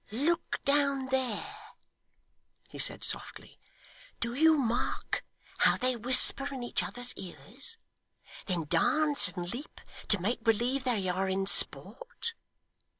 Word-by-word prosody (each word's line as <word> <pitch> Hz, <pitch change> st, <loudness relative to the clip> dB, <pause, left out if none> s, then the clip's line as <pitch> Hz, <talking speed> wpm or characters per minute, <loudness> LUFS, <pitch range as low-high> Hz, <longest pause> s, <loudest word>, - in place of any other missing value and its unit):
'Look 295 Hz, +11 st, -1 dB
down 280 Hz, -2 st, +1 dB
there,' 265 Hz, -, -3 dB, 1.1 s
he -, -, -11 dB
said -, -, -3 dB
softly; -, -, -4 dB, 0.6 s
'do 235 Hz, 0 st, -3 dB
you 315 Hz, +4 st, +4 dB
mark 240 Hz, -3 st, -2 dB, 0.4 s
how -, -, +3 dB
they 255 Hz, 0 st, 0 dB
whisper 255 Hz, +4 st, +4 dB
in 260 Hz, -3 st, -6 dB
each 240 Hz, -, -2 dB
other's 245 Hz, 0 st, -2 dB
ears; 455 Hz, -, -8 dB, 0.7 s
then 180 Hz, -4 st, -1 dB
dance 290 Hz, -, +3 dB
and 180 Hz, 0 st, -6 dB
leap, 275 Hz, +6 st, -9 dB, 0.3 s
to 205 Hz, -, +5 dB
make 220 Hz, +6 st, -2 dB
believe 245 Hz, +4 st, 0 dB
they 220 Hz, -7 st, -1 dB
are 190 Hz, +1 st, -1 dB
in 190 Hz, +1 st, -1 dB
sport? 465 Hz, -, +3 dB
250 Hz, 125 wpm, -29 LUFS, 205-280 Hz, 1.1 s, to